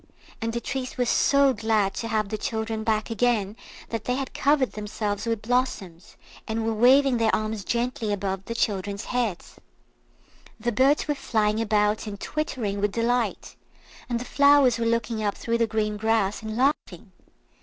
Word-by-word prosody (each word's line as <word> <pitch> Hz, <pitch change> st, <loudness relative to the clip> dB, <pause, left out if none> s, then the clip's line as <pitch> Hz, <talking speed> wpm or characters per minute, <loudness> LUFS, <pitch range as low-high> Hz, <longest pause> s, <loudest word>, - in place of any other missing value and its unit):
And 230 Hz, 0 st, -1 dB
the 235 Hz, -, -2 dB
trees 255 Hz, +1 st, -5 dB
were 250 Hz, -, +1 dB
so 280 Hz, +3 st, +3 dB
glad 215 Hz, -3 st, +1 dB
to 230 Hz, -, -4 dB
have 215 Hz, -3 st, -1 dB
the 215 Hz, -, -3 dB
children 220 Hz, 0 st, -3 dB
back 220 Hz, +1 st, 0 dB
again 225 Hz, -3 st, +1 dB, 0.3 s
that 225 Hz, -2 st, -4 dB
they 250 Hz, -, 0 dB
had 270 Hz, 0 st, -4 dB
covered 280 Hz, -2 st, +2 dB
themselves 210 Hz, 0 st, -4 dB
with 225 Hz, -2 st, -1 dB
blossoms, 215 Hz, -8 st, -2 dB, 0.3 s
and 220 Hz, 0 st, -2 dB
were 225 Hz, -, 0 dB
waving 255 Hz, +3 st, +5 dB
their 225 Hz, -1 st, +2 dB
arms 215 Hz, -1 st, -3 dB
gently 235 Hz, -1 st, -1 dB
above 195 Hz, -1 st, -3 dB
the 230 Hz, -, -5 dB
children's 200 Hz, -1 st, -2 dB
heads. 235 Hz, -8 st, -3 dB, 1.0 s
The 240 Hz, +2 st, -1 dB
birds 270 Hz, +8 st, +3 dB
were 295 Hz, -, +1 dB
flying 220 Hz, -5 st, 0 dB
about 210 Hz, 0 st, +1 dB
and 200 Hz, -1 st, -6 dB
twittering 235 Hz, -10 st, -3 dB
with 205 Hz, 0 st, +1 dB
delight, 235 Hz, +1 st, -1 dB, 0.5 s
and 240 Hz, -1 st, -1 dB
the 245 Hz, -, -6 dB
flowers 280 Hz, -3 st, +4 dB
were 230 Hz, -, 0 dB
looking 230 Hz, -1 st, -1 dB
up 205 Hz, -1 st, -1 dB
through 230 Hz, 0 st, -1 dB
the 230 Hz, -, +2 dB
green 210 Hz, -1 st, -1 dB
grass 215 Hz, -2 st, 0 dB
and 220 Hz, 0 st, -5 dB
laughing. 240 Hz, -, -1 dB
225 Hz, 170 wpm, -25 LUFS, 210-245 Hz, 1.0 s, waving